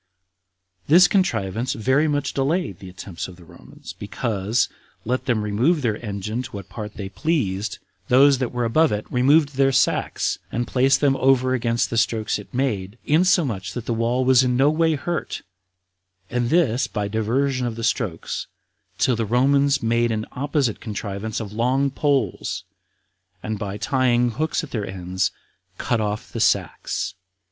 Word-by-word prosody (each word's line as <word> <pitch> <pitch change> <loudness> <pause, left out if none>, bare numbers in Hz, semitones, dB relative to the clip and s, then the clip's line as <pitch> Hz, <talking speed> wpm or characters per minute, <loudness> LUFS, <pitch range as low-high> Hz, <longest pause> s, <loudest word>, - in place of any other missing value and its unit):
This 175 +4 +7
contrivance 115 - 0
very 130 +7 +2
much 145 -2 -1
delayed 140 - -1
the 95 - -9
attempts 90 -1 -7
of 90 - -11
the 85 -1 -16
Romans, 85 +1 -12
because, 105 +1 -1 0.4
let 125 +3 -1
them 115 -4 +1
remove 125 +10 +1
their 110 -1 -1
engine 105 +2 -3
to 130 +1 -8
what 100 -2 -8
part 105 +1 -7
they 100 - -5
pleased, 105 - -1 0.3
those 135 +1 +5
that 130 -3 -1
were 120 -1 -1
above 155 +5 +3
it 105 0 -2
removed 140 +4 +4
their 135 0 +4
sacks, 130 - +1
and 120 +1 -1
placed 135 +3 +2
them 140 -2 +3
over 130 -1 +3
against 115 -1 0
the 115 - +2
strokes 110 -2 0
it 105 - -12
made, 110 -6 -2
insomuch 150 - +2
that 120 - -5
the 120 - -1
wall 120 +3 0
was 130 0 +6
no 130 +3 +3
way 160 0 +2
hurt, 170 +4 -4 0.9
and 120 -1 0
this 145 -8 +2
by 105 0 -3
diversion 125 +5 0
of 115 - -4
the 115 - -6
strokes, 110 -7 -2 0.5
till 125 - +2
the 115 - -1
Romans 135 +4 +2
made 115 +1 +2
an 110 0 -2
opposite 140 -3 -1
contrivance 105 -1 -4
of 105 -2 -6
long 130 +5 +1
poles, 135 - -1 0.8
and 110 -1 -3
by 100 -1 -4
tying 120 +2 +2
hooks 155 +8 -1
at 160 - -8
their 110 -4 -2
ends, 95 -1 -2 0.5
cut 120 -2 0
off 105 0 -3
the - - -4
sacks. - - 0
120 Hz, 160 wpm, -23 LUFS, 105-135 Hz, 0.9 s, This